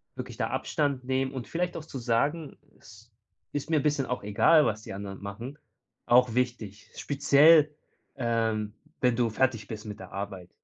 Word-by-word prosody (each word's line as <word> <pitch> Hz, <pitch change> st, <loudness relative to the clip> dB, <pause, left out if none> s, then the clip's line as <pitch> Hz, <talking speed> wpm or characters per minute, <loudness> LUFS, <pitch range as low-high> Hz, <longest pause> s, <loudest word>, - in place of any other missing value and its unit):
wirklich -, -, -7 dB
da -, -, 0 dB
Abstand 140 Hz, -4 st, -1 dB
nehmen 130 Hz, +1 st, -1 dB
und 130 Hz, -3 st, -6 dB
vielleicht 175 Hz, +1 st, -2 dB
auch 155 Hz, -, -8 dB
zu 135 Hz, -, -7 dB
sagen: 140 Hz, +6 st, -1 dB, 0.2 s
„Es -, -, -17 dB, 0.4 s
ist 145 Hz, +1 st, -4 dB
mir 160 Hz, -, +3 dB
'n -, -, -3 dB
bisschen 145 Hz, -2 st, +1 dB
auch 125 Hz, -4 st, -3 dB
egal, 145 Hz, +9 st, +4 dB
was 110 Hz, 0 st, -1 dB
die -, -, -7 dB
anderen 100 Hz, 0 st, -7 dB
machen” 115 Hz, +8 st, -7 dB, 0.5 s
Auch 120 Hz, -1 st, +4 dB
wichtig. 115 Hz, -5 st, -3 dB
Speziell, 150 Hz, +2 st, +5 dB, 0.4 s
ähm, 110 Hz, -3 st, -1 dB, 0.3 s
wenn 125 Hz, -2 st, +3 dB
du 120 Hz, -1 st, +1 dB
fertig 115 Hz, -2 st, 0 dB
bist 110 Hz, 0 st, -7 dB
mit 105 Hz, -1 st, -7 dB
der 95 Hz, -, -10 dB
Arbeit. 95 Hz, -2 st, -6 dB
125 Hz, 175 wpm, -28 LUFS, 105-140 Hz, 0.5 s, Speziell